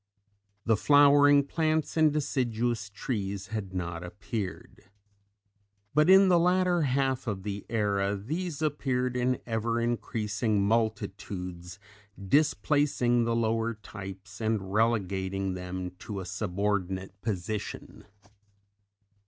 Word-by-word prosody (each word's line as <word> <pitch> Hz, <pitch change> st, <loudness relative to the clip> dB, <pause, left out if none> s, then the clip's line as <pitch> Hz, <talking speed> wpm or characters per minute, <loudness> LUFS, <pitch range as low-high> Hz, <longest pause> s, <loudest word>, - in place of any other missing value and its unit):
The 115 Hz, -, +4 dB
flowering 145 Hz, +3 st, +6 dB
plants 155 Hz, 0 st, 0 dB
and 155 Hz, -2 st, +4 dB
deciduous 120 Hz, -6 st, -1 dB
trees 100 Hz, -2 st, -4 dB
had 105 Hz, -4 st, -4 dB
not 85 Hz, -2 st, -4 dB
appeared. 95 Hz, +2 st, -6 dB, 1.0 s
But 150 Hz, +3 st, +4 dB
in 190 Hz, +1 st, +8 dB
the 175 Hz, -2 st, +5 dB
latter 180 Hz, 0 st, +3 dB
half 135 Hz, -2 st, 0 dB
of 100 Hz, -3 st, -3 dB
the 100 Hz, -1 st, -5 dB
era 100 Hz, -3 st, 0 dB
these 155 Hz, -, -4 dB
appeared 130 Hz, -4 st, -1 dB
in 125 Hz, 0 st, +1 dB
ever 115 Hz, 0 st, -1 dB
increasing 110 Hz, -3 st, -1 dB
multitudes, 100 Hz, -5 st, -2 dB, 0.4 s
displacing 130 Hz, +1 st, +2 dB
the 115 Hz, 0 st, 0 dB
lower 115 Hz, 0 st, 0 dB
types 95 Hz, -1 st, -10 dB
and 105 Hz, -4 st, -1 dB
relegating 95 Hz, -3 st, 0 dB
them 90 Hz, 0 st, -5 dB
to 105 Hz, -3 st, -6 dB
a 95 Hz, -, -6 dB
subordinate 95 Hz, -1 st, -2 dB
position. 105 Hz, -1 st, -5 dB
110 Hz, 105 wpm, -28 LUFS, 95-130 Hz, 1.0 s, in